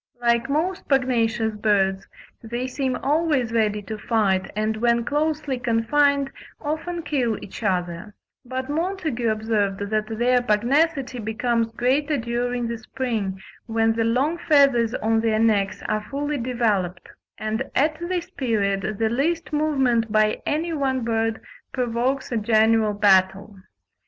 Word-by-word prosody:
Like 235 +1 +1
most 350 +7 -1
pugnacious 235 -4 +1
birds, 200 -2 +1 0.3
they 240 +2 -4
seem 260 0 -2
always 290 -5 +1
ready 210 -2 +1
to 215 +1 -6
fight, 200 -5 +1
and 215 +1 -1
when 235 +1 +2
closely 300 -2 -1
confined, 270 +4 +2 0.3
often 325 +3 -3
kill 245 -9 0
each 195 - -10
other; 185 0 -2 0.3
but 260 +1 -4
Montagu 315 -7 -1
observed 210 -2 -1
that 215 0 0
their 245 +1 +3
pugnacity 260 +4 +1
becomes 230 +1 -1
greater 285 +6 +1
during 240 0 -2
the 230 -1 -4
spring, 220 -5 -3 0.3
when 225 0 +2
the 225 0 0
long 265 +9 +1
feathers 275 -7 +3
on 225 0 +1
their 225 -1 +1
necks 200 -3 +1
are 215 0 0
fully 290 +1 -2
developed; 215 -8 -1 0.3
and 215 0 -3
at 310 +3 +2
this 345 0 -3
period 215 - -1
the 225 - +1
least 315 +7 -1
movement 265 -7 +1
by 215 0 +2
any 325 +3 -1
one 265 -4 0
bird 225 -1 0 0.3
provokes 250 +2 -1
a 235 - 0
general 220 0 +3
battle. 195 0 +3
235 Hz, 135 wpm, -23 LUFS, 215-275 Hz, 0.3 s, their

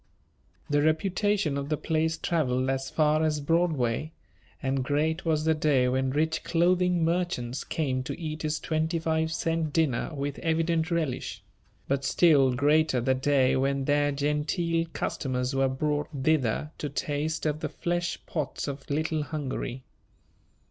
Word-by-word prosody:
The 145 -1 +2
reputation 175 0 +1
of 140 +1 -5
the 150 - 0
place 160 +1 0
travelled 130 -6 0
as 135 0 -2
far 155 0 +2
as 155 -1 +1
Broadway, 155 -3 0 0.5
and 135 0 -1
great 155 +5 0
was 155 -1 +1
the 160 - +4
day 145 -5 +2
when 130 +1 +1
rich 160 +4 0
clothing 180 0 +2
merchants 165 -8 -1
came 135 -5 -1
to - - -5
eat 155 -2 -4
his 155 0 -1
twenty 160 +1 -1
five 160 0 0
cent 165 -2 -1
dinner 155 -8 +1
with 140 0 -3
evident 165 0 +1
relish; 165 -7 -2 0.4
but 135 0 0
still 140 -2 +4
greater 150 0 +3
the 130 +2 +2
day 130 0 +2
when 135 +1 0
their 145 0 +2
Gentile 150 +4 0
customers 125 -2 -2
were 135 0 +2
brought 145 +2 -1
thither 150 0 +1
to 150 - -3
taste 150 +3 -2
of 150 0 0
the - - -3
fleshpots 170 -5 -3
of 140 -1 -6
"Little 155 +2 0
Hungary." 135 -4 -4
150 Hz, 145 wpm, -27 LUFS, 135-160 Hz, 0.5 s, the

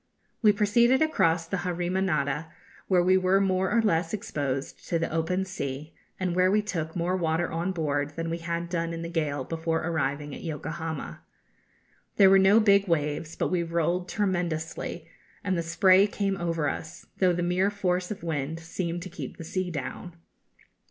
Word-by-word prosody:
We 215 -3 +7
proceeded 235 +7 +3
across 165 - +2
the 190 +4 -2
Harima 180 +1 -1
Nada, 150 -3 -1 0.4
where 180 -2 +4
we 185 +1 +5
were 185 +1 +3
more 190 -1 +1
or 230 -1 +3
less 165 -2 +1
exposed 140 -8 -4
to 170 - +2
the 165 - -2
open 165 +4 0
sea, 150 -5 -5 0.3
and 180 -2 -1
where 185 0 +4
we 210 +2 +2
took 160 -6 -3
more 175 +1 0
water 165 -1 0
on 170 +3 -1
board 145 -4 -1
than 165 0 -3
we 165 - -2
had 170 0 -3
done 170 -1 -2
in 165 0 -5
the 170 - -5
gale 150 -5 -1
before 165 +2 -2
arriving 150 -3 -2
at - - -8
Yokohama. 160 0 -5 0.9
There 195 -1 +7
were 195 - +7
no 195 +3 +6
big 200 -2 +4
waves, 155 -1 -1
but - - -1
we 180 -2 +2
rolled 170 +2 -1
tremendously, 175 -4 -2 0.4
and 190 -2 0
the 170 - 0
spray 185 +4 +5
came 200 -1 -1
over 165 -4 -1
us, 160 +3 -5
though 185 -2 +3
the 175 0 -1
mere 180 +3 +2
force 185 -3 -1
of 210 - -5
the - - -9
wind 160 0 -2
seemed 170 +1 -4
to 185 - -7
keep - - -7
the - - -7
sea 185 +2 -2
down. 165 +3 -6
170 Hz, 185 wpm, -27 LUFS, 160-185 Hz, 0.9 s, We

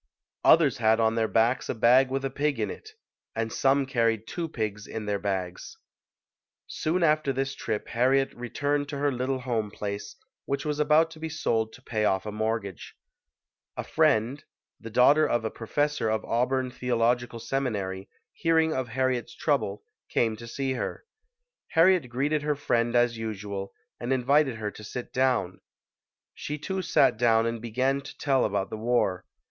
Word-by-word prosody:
Others 150 -5 +5
had 110 -1 +3
on 110 0 +3
their 115 -1 +1
backs 115 +4 +1
a - - -1
bag 125 +4 +5
with 135 +1 -2
a 135 - -2
pig 145 -1 -1
in 105 - -1
it; 435 0 -11 0.4
and 115 0 -2
some 135 +1 +2
carried 115 -4 +1
two 170 +4 -4
pigs 110 -5 -4
in 110 -1 -5
their 100 -1 -1
bags. 95 -3 -4 0.9
Soon 170 +3 -1
after 155 -3 +3
this 135 +1 -2
trip 110 -5 -4
Harriet 135 +3 +2
returned 145 +4 -2
to 145 - -4
her 145 0 +1
little 130 +1 -2
home 115 -5 -1
place, 100 0 -5 0.3
which 140 +2 -2
was 150 -1 -2
about 155 +2 +4
to 160 - -12
be 160 0 -4
sold 115 -8 -1
to - - -15
pay 110 -2 -2
off 95 -2 +1
a 105 - -4
mortgage. 110 -3 -3 0.8
A - - -2
friend, 115 +6 +1 0.4
the 115 - -8
daughter 140 +7 +5
of 120 -1 0
a 110 - -2
professor 145 +1 -1
of 110 0 -1
Auburn 125 +2 0
Theological 120 -1 0
Seminary, 105 -6 -3 0.2
hearing 160 -1 +2
of 130 -3 -2
Harriet's 130 0 -1
trouble, 105 -9 -1 0.3
came 115 -2 +1
to 115 +1 -9
see 135 +3 -2
her. 130 - -4 0.7
Harriet 165 -5 +4
greeted 140 +5 0
her 150 0 0
friend 120 -4 0
as 120 -1 +2
usual 100 -3 -5 0.3
and 120 +2 -3
invited 135 +1 +3
her 105 -2 -4
to 105 - -12
sit 120 +3 -7
down; 125 -8 +1 0.7
she 150 - -5
too 190 +5 -3
sat 165 - +3
down 115 -1 +3
and 115 -1 -2
began 130 +4 0
to - - -11
tell 135 -2 +2
about 100 -2 -1
the 110 - -4
war. 110 -5 0
120 Hz, 170 wpm, -27 LUFS, 110-140 Hz, 0.9 s, Others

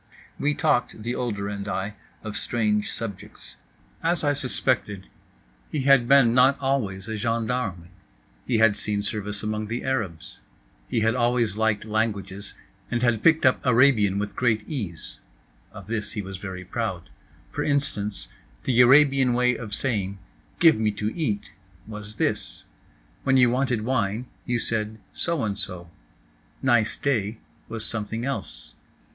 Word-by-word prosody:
We 145 +1 +1
talked, 115 -3 +1
the 120 +2 -2
older 105 -6 -2
and 100 0 -5
I, 100 +1 -2 0.3
of 110 -1 -5
strange 105 -3 0
subjects. 100 -5 -8 0.5
As 170 0 +1
I 145 -1 +3
suspected, 110 -6 -1 0.6
he 150 - -1
had 135 -3 +5
been 135 -3 +6
not 130 +2 +5
always 115 -8 -1
a 110 -1 -3
gendarme. 115 -6 -2 0.6
He 120 - +2
had 110 -2 +5
seen 105 -1 -2
service 105 0 -3
among 110 0 -2
the 120 +3 -3
Arabs. 105 -12 -3 0.5
He 115 - 0
had 110 +1 +3
always 120 -4 +1
liked 110 -1 +1
languages 105 -2 -2 0.3
and 120 0 -1
had 115 -3 +2
picked 160 -3 +4
up 130 - +3
Arabian 115 -6 +4
with 105 0 -3
great 110 -4 +1
ease—of 80 - -9
this 105 -2 -2
he 105 - -2
was 95 0 -6
very 95 -1 -7
proud. - - -4 0.4
For - - -2
instance—the 105 - 0
Arabian 135 0 +6
way 125 0 +3
of 110 -4 -7
saying 100 -5 -1 0.4
"Give 165 -9 +6
me 110 -1 +2
to 105 +1 -3
eat" 110 -12 -2 0.3
was 105 0 -7
this; - - -1 0.6
when 135 0 +3
you 125 -2 +5
wanted 125 -3 0
wine 115 -2 0 0.2
you 120 -1 +1
said 110 -1 -2 0.2
so 170 -6 0
and 105 -2 -1
so; 85 -1 -5 0.7
"Nice 110 -4 +3
day" 115 -6 0 0.3
was 110 -1 -3
something 115 +1 -2
else. 140 0 -3
110 Hz, 145 wpm, -25 LUFS, 105-125 Hz, 0.7 s, been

